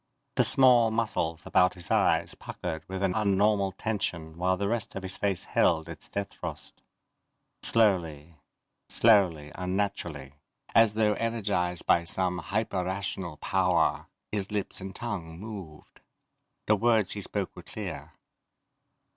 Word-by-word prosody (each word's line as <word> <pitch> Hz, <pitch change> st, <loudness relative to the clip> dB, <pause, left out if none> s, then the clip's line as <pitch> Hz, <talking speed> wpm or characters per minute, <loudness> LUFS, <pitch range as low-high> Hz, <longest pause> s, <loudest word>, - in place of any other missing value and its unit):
The -, -, +4 dB
small 125 Hz, -4 st, +6 dB
muscles 110 Hz, -8 st, -1 dB
about 90 Hz, 0 st, +3 dB
his 90 Hz, -2 st, -8 dB
eyes -, -, +2 dB
puckered 80 Hz, 0 st, -6 dB
with 95 Hz, +1 st, -3 dB
an 95 Hz, -2 st, +2 dB
unnormal 100 Hz, -1 st, +2 dB
tension 85 Hz, -7 st, -3 dB
while 90 Hz, +2 st, +1 dB
the 100 Hz, +1 st, -1 dB
rest 115 Hz, 0 st, -2 dB
of 95 Hz, -, -5 dB
his 95 Hz, 0 st, -2 dB
face 100 Hz, -3 st, -1 dB
held 80 Hz, -2 st, +2 dB
its -, -, -10 dB
death 100 Hz, 0 st, -4 dB
frost. -, -, -8 dB, 0.8 s
Slowly, 85 Hz, -8 st, +1 dB, 0.6 s
slowly, 90 Hz, -10 st, +3 dB
unnaturally 90 Hz, -7 st, -3 dB, 0.4 s
as 115 Hz, -2 st, +5 dB
though 110 Hz, -1 st, +3 dB
energized 100 Hz, -7 st, -1 dB
by 85 Hz, -, +3 dB
some 90 Hz, +1 st, 0 dB
hyper 100 Hz, 0 st, -2 dB
rational 95 Hz, -3 st, -4 dB
power 90 Hz, -4 st, +1 dB, 0.2 s
his 100 Hz, -2 st, -3 dB
lips 105 Hz, -2 st, -3 dB
and 95 Hz, 0 st, -7 dB
tongue 90 Hz, -9 st, -5 dB
moved. 95 Hz, -8 st, -10 dB, 0.6 s
The 110 Hz, -, +4 dB
words 110 Hz, -2 st, +2 dB
he 105 Hz, -, -2 dB
spoke -, -, -4 dB
were -, -, -9 dB
clear. -, -, -7 dB
95 Hz, 135 wpm, -28 LUFS, 85-105 Hz, 0.8 s, small